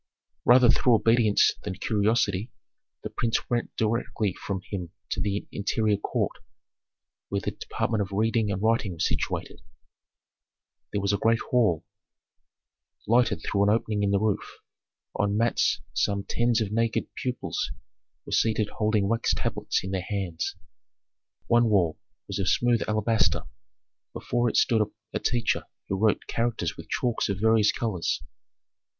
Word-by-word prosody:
Rather 125 0 +7
through 120 0 +4
obedience 115 -1 +4
than 95 -2 -5
curiosity, 105 +1 +1 0.5
the - - -4
prince 115 -1 -1
went 120 -1 -1
directly 110 -3 0
from 95 0 -4
him 90 -4 -4 0.2
to - - -1
the 100 0 -1
interior 105 +1 +1
court, - - -1 1.0
where 100 0 -1
the - - -2
department 110 -1 -2
of 100 0 -3
reading 110 +1 +1
and 95 +1 -3
writing 110 -4 +1
was 80 - 0
situated. - - -3 1.3
That 100 - -1
was 100 +1 +1
a 100 - 0
great 115 +1 +3
hall, 110 -11 +2 1.2
lighted 120 +3 +2
through 100 - 0
an 100 - +4
opening 110 -1 +1
in 100 - +2
the 100 - +3
roof. 105 -1 -1 0.6
On 100 0 +1
mats 115 +1 +2
some 100 +11 0
tens 120 -1 +1
of 105 -2 -2
naked 115 +1 0
pupils 125 -1 -3 0.6
were - - -9
seated 110 -2 +2
holding 105 -2 +2
wax 115 +2 +1
tablets - - -1
in 95 - -4
their 95 -1 -1
hands. 95 -5 -2 0.9
One 120 0 +4
wall 90 -7 +2 0.3
was - - -4
of 95 - +1
smooth 120 -1 +2
alabaster; 110 +1 +1 0.7
before 120 0 0
it - - -1
stood 115 -2 +4 0.3
a - - -1
teacher 120 -2 0 0.2
who 95 - 0
wrote 110 0 +2
characters 115 -1 -1
with - - -11
chalks 120 -3 0
of 100 -1 -2
various 110 0 +4
colors. 100 -8 -1
110 Hz, 145 wpm, -26 LUFS, 100-115 Hz, 1.3 s, Rather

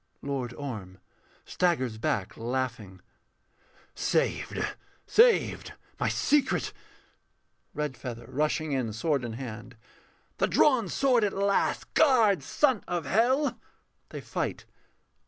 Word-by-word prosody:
_] - - -7
LORD 130 -4 -2
ORM 105 -10 -7 0.5
[staggers 130 -11 0
back 100 -3 -1
laughing]. 115 -6 -4 0.9
Saved, - - 0 0.4
saved, 470 +1 +3 0.3
my - - +1
secret. 290 -2 +1 1.0
REDFEATHER 125 -5 -5
[rushing 155 +2 0
in, 125 -5 -1
sword 140 +4 0
in 120 -1 -4
hand]. 120 0 -8 0.6
The - - +3
drawn 250 -9 +3
sword 255 -1 +2
at 205 - +1
last! 200 0 0
Guard, 230 - +4
son 245 - +1
of 175 -3 -2
hell! 245 - +2 0.5
[_They - - -7
fight. - - -3
145 Hz, 105 wpm, -28 LUFS, -, 1.0 s, Guard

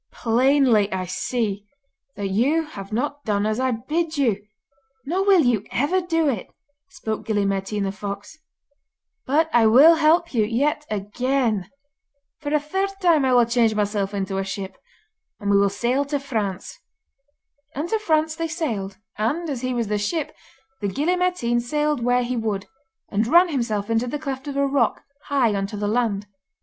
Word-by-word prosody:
'Plainly 240 -3 +3
I 185 -1 -2
see 205 +1 -2 0.5
that 200 -1 -3
you 275 +12 +2
have 200 -9 -9
not 285 +5 -2
done 205 -1 0
as 215 +2 0
I 260 0 +1
bid 310 +7 -2
you, 225 -8 +1 0.6
nor 360 +7 0
will 390 -3 +5
you 240 -7 +2
ever 335 +9 +1
do 330 -3 0
it,' 235 -9 -2 0.4
spoke 220 -4 -5
Gille 205 -2 +1
Mairtean 195 +1 -1
the 195 - -1
fox; 200 +9 -7 0.9
'but 310 +5 +3
I 230 -2 +5
will 275 +9 +8
help 325 +1 +3
you 225 -3 +3
yet 285 +7 0
again. 215 0 -1 0.7
for 290 -2 -4
a 300 - +3
third 385 +7 -1
time 335 -6 +4
I 260 - +2
will 240 -1 +6
change 230 -2 +2
myself 205 -1 -1
into 195 -1 -2
a - - -1
ship, 190 0 -5 0.6
and 205 -2 -1
we 200 - +5
will 200 0 +4
sail 240 +7 0
to 285 0 -2
France.' 220 - -4 1.0
And 295 +5 -2
to 445 - +1
France 315 -5 +1
they 330 +1 -2
sailed, 230 - -3 0.2
and, 295 +11 -1
as 255 -4 -4
he 255 0 -2
was 240 -2 -1
the 210 0 -1
ship, 290 +9 -2 0.4
the 205 - -2
Gille 295 - 0
Mairtean 360 -10 0
sailed 295 +2 -1
where 245 +1 +2
he 250 +1 -2
would, 215 -4 -2 0.4
and 215 +2 0
ran 345 +6 +6
himself 230 -8 -1
into 230 +2 0
the 295 - -3
cleft 275 -2 -5
of 280 -1 -4
a 280 - +3
rock, 275 -4 +1 0.2
high 260 -6 +2
on 195 -1 -1
to 210 - -7
the 205 0 -2
land. 210 -2 0
240 Hz, 180 wpm, -23 LUFS, 205-295 Hz, 1.0 s, will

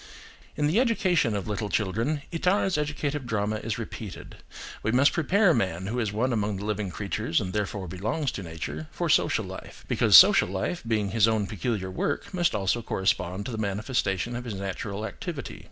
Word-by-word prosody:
In 150 - 0
the 160 +9 +3
education 185 - +2
of 100 - -3
little 105 0 -2
children 115 - -1
Itard's 180 +2 +1
educative 150 -2 -2
drama 110 -1 -1
is 110 -1 -3
repeated: - - -7 0.4
we 110 - 0
must 130 +4 +4
prepare 180 +3 +3
man, 95 - -1
who 115 +5 -2
is 110 -4 -1
one 120 +5 0
among 105 -2 -1
the 100 - -5
living 105 -2 -2
creatures 90 -3 -1
and 90 -1 -4
therefore 100 -2 -2
belongs 110 - -2
to - - -6
nature, 80 -2 -6
for - - -2
social - - +3
life, - - -10
because - - +6
social - - +7
life 100 - -2
being 105 -3 0
his 115 0 +4
own 110 -2 +1
peculiar 95 0 -3
work, 145 - -2
must 175 -7 +1
also 100 +3 0
correspond 95 -2 -1
to - - -4
the 110 - -4
manifestation 105 +1 -1
of 120 - -4
his 110 -4 -4
natural 100 +2 -4
activity. 100 - -6
110 Hz, 185 wpm, -27 LUFS, 95-135 Hz, 0.4 s, social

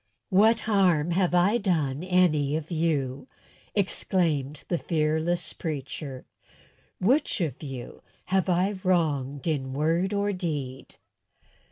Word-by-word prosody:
"What 220 +4 +5
harm 180 -7 +2
have 180 0 +2
I 195 +7 +4
done 160 - 0
any 170 -6 +2
of 160 +2 -4
you?" 155 - -1 0.5
exclaimed 160 -7 0
the 175 - 0
fearless 160 +2 0
preacher. 140 -3 -5 0.7
"Which 250 +6 +2
of 155 -7 -2
you 135 -5 -7 0.2
have 190 0 +1
I 185 +3 +1
wronged 145 -7 0
in 135 -5 -1
word 165 +7 +1
or 205 0 0
deed?" 145 -8 -4
165 Hz, 115 wpm, -27 LUFS, 145-185 Hz, 0.7 s, What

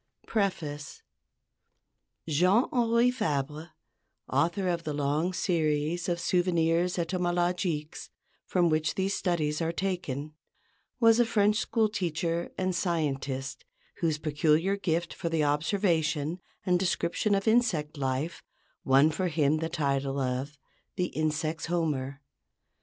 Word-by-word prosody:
PREFACE 155 -9 -2 1.2
Jean 180 - +4
Henri 235 0 +3
Fabre, 150 - -2 0.6
author 175 +3 +1
of 170 -2 -1
the 150 -2 -3
long 145 +5 0
series 165 -2 0
of 175 0 0
"Souvenirs 175 0 +1
Entomologiques" 175 -2 -1 0.3
from 175 -2 +2
which 155 0 +1
these 195 +1 0
studies 155 -4 0
are 165 0 0
taken, 165 -6 -3 0.7
was 230 -1 +5
a - - +7
French 210 -2 +2
school 220 0 +1
teacher 170 -4 -2
and 185 0 0
scientist 145 - -2 0.3
whose 160 -3 0
peculiar 155 +5 +2
gift 170 -4 -1
for 170 - -3
the 160 -2 +1
observation 160 0 +1 0.3
and 180 -1 +3
description 190 +2 +1
of 195 +2 -2
insect 215 -11 +2
life 135 +3 -2 0.4
won 135 +4 +5
for 185 +4 -1
him 150 -2 +2
the 160 +1 -2
title 140 -4 -1
of 135 +3 -2 0.4
the 180 -1 -1
"insects' 155 +1 -2
Homer." 145 -5 -1
165 Hz, 120 wpm, -28 LUFS, 150-180 Hz, 1.2 s, a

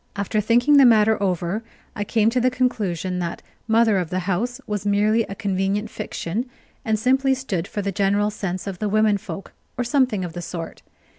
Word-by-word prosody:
After 205 +1 -1
thinking 240 +7 +4
the 275 - +8
matter 220 -2 +4
over, 185 +2 -1 0.3
I 205 - -2
came 220 +1 +2
to 250 +1 +1
the 255 - +3
conclusion 200 -8 -1
that 170 -1 -4 0.2
"mother 225 -3 +4
of 175 -3 -3
the 185 +1 -1
house" 210 +8 -2
was 205 -2 -3
merely 205 +2 +2
a 200 - -5
convenient 200 +1 -1
fiction, 220 +10 -4 0.3
and 220 -1 +1
simply 265 +4 +2
stood 200 -10 -3
for 205 - -4
the 200 - -1
general 200 +2 +1
sense 185 -3 -4
of 195 -3 -5
the 210 - -1
women 215 -1 +3
folk, 195 - -8 0.2
or 245 - 0
something 245 -7 +1
of 170 - -7
the 175 - -5
sort. 165 -1 -7
210 Hz, 195 wpm, -22 LUFS, 190-230 Hz, 0.3 s, the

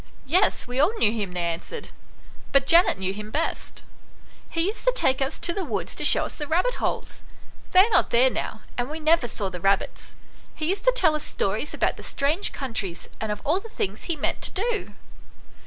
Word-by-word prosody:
" - - -28
Yes, 360 +9 +2
we 250 +1 -4
all 375 +11 +3
knew 210 - +3
him," 205 -5 -3
they 175 -1 -2
answered, 170 - -4 0.3
" - - -23
but 275 -1 +4
Janet 335 - +5
knew 190 0 -2
him 210 +1 -7
best. 305 +9 -3 0.7
He 330 - -1
used 415 +4 -3
to - - +5
take 265 - +2
us 270 - -1
to 345 - -2
the 390 - -2
woods 200 - -2
to - - -5
show - - +5
us - - -5
the 295 - -6
rabbit 360 +11 +1
holes. - - -3 0.5
They 370 - +8
are 420 - +3
not - - +3
there 255 +2 +4
now, 220 - -4 0.2
and 245 +2 -1
we 310 +1 -5
never 315 -4 +3
saw 205 -3 -3
the 180 - -6
rabbits. 195 +1 0 0.4
He 310 +1 -2
used 390 +4 -2
to - - +5
tell 330 -11 +4
us 305 - -4
stories 215 +9 -2
about - - 0
the - - -9
strange 300 +8 0
countries, 220 -10 -4
and 220 -1 -2
of 210 - -5
all 315 +6 +2
the 455 - -11
things 200 - -4
he 340 - -1
meant - - -2
to - - +2
do." 435 +2 -2
280 Hz, 220 wpm, -25 LUFS, -, 0.7 s, They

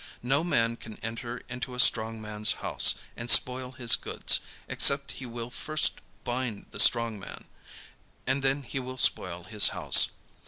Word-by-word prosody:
No 135 +5 -1
man 115 -9 -1
can 110 -2 -13
enter 120 +2 -8
into 125 +1 -8
a - - -9
strong 115 -2 +3
man's 105 0 0
house, - - +3 0.2
and 115 +1 -8
spoil 125 +2 +3
his 120 -2 +3
goods, - - +1 0.3
except 140 0 +2
he 130 - -8
will 120 0 -9
first 155 +4 0 0.2
bind 120 -4 -6
the - - -9
strong 115 -3 +3
man; 95 - -11 0.8
and 130 +2 -2
then 135 +1 -2
he 135 - -7
will 130 0 -9
spoil 90 -7 0
his 105 +3 +3
house. - - +5
120 Hz, 160 wpm, -26 LUFS, 115-130 Hz, 0.8 s, house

